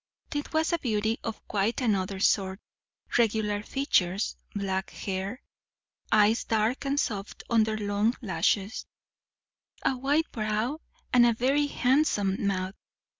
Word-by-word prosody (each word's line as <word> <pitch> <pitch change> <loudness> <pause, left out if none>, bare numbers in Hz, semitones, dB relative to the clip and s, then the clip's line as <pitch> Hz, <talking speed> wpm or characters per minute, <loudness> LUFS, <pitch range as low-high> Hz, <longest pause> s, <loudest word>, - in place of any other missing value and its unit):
This 290 -1 -2
was 320 +2 +1
a 340 - +2
beauty 220 -3 0
of 225 -1 -6
quite 210 +2 0
another 195 -6 0
sort. 190 0 +2 0.6
Regular 210 -2 +1
features, 205 -6 0 0.2
black 190 -1 -2
hair, 195 +6 -4 0.7
eyes 215 +1 +4
dark 225 +5 0
and 280 +1 +1
soft 205 -5 -3
under 220 -1 +3
long 205 +3 +1
lashes, 200 -1 0 1.0
a 265 - +3
white 285 +5 +1
brow 215 +6 -1 0.3
and 245 -1 +7
a 240 -1 +5
very 275 +5 +2
handsome 245 -9 +1
mouth. 185 -1 -1
215 Hz, 125 wpm, -28 LUFS, 200-250 Hz, 1.0 s, and